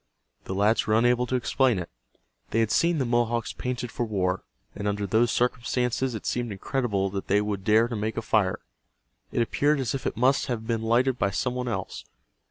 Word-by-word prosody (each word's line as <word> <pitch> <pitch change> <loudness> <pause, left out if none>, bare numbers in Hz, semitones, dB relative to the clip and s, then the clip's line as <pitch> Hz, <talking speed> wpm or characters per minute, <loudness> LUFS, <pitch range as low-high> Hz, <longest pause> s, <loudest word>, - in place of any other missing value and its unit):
The 95 - -4
lads 105 +3 +2
were 110 - +3
unable 120 +1 +3
to 130 - -1
explain 125 -1 +2
it. 90 -2 -4 0.6
They 115 - 0
had 110 -2 0
seen 170 0 +3
the 135 - 0
Mohawks 120 -1 0
painted 125 -1 -4
for - - -2
war, 95 -4 -1 0.3
and 105 0 -4
under 100 0 -1
those 110 +5 +2
circumstances 125 +1 0
it 110 - -7
seemed 120 -2 -1
incredible 100 -2 -1
that 95 0 -4
they 100 +2 +3
would 105 -2 -2
dare 110 +3 +4
to 120 - -4
make 110 +1 -3
a 115 - -2
fire. 105 -4 +1 0.7
It 120 - +2
appeared 145 +5 +1
as 130 -2 -1
if 135 -2 -3
it - - -3
must 130 +4 +3
have 115 -3 -3
been 115 -1 -1
lighted 120 +3 +2
by 100 - +2
some 125 +5 -1
one 125 0 -3
else. 95 -6 -4
115 Hz, 205 wpm, -26 LUFS, 105-125 Hz, 0.7 s, dare